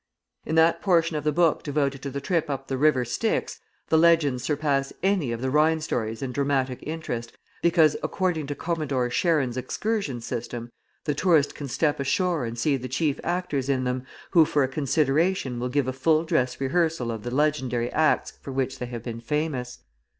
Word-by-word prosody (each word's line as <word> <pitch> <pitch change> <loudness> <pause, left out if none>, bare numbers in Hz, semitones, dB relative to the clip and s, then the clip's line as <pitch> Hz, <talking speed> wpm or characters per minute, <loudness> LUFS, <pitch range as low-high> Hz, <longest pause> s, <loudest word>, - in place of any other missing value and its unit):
In 160 - -1
that 160 +1 +4
portion 170 -4 +2
of 150 - -2
the 150 - +2
book 165 +1 +2
devoted 140 -2 -1
to 140 - -4
the 140 +1 -4
trip 160 +2 -1
up 135 -1 -3
the 135 - -1
river 140 -4 +3
Styx 215 - -1 0.3
the 160 - +4
legends 160 -7 +4
surpass 140 -1 0
any 190 -10 +1
of 115 0 -4
the 130 - 0
Rhine 155 +2 +3
stories 115 -6 -3
in 130 - -3
dramatic 135 -2 0
interest, 145 -7 -5 0.2
because, 165 -3 +4
according 175 -6 -1
to 145 - -3
Commodore 145 -8 -1
Charon's 150 -6 +1
excursion 150 - -2
system, 120 0 -5 0.3
the 150 - 0
tourist 155 -1 +3
can 145 - -6
step 145 +3 0
ashore 165 +1 0
and 115 +1 -5
see 140 +4 +1
the 130 0 -6
chief 145 +2 0
actors 170 -7 -1
in 130 -2 +1
them, 125 0 -2 0.3
who 170 -4 +7
for 145 -2 +1
a - - +1
consideration 145 0 +1
will 125 +1 -2
give 140 0 0
a 130 - -1
full 155 +4 +2
dress 130 -6 0
rehearsal 140 -2 0
of 110 -2 -5
the 120 - -5
legendary 130 -4 0
acts 155 0 +2
for 140 - -7
which 130 0 -2
they 125 - -4
have 120 -2 -6
been 115 -1 -6
famous. 130 -2 -3
140 Hz, 190 wpm, -25 LUFS, 125-160 Hz, 0.3 s, who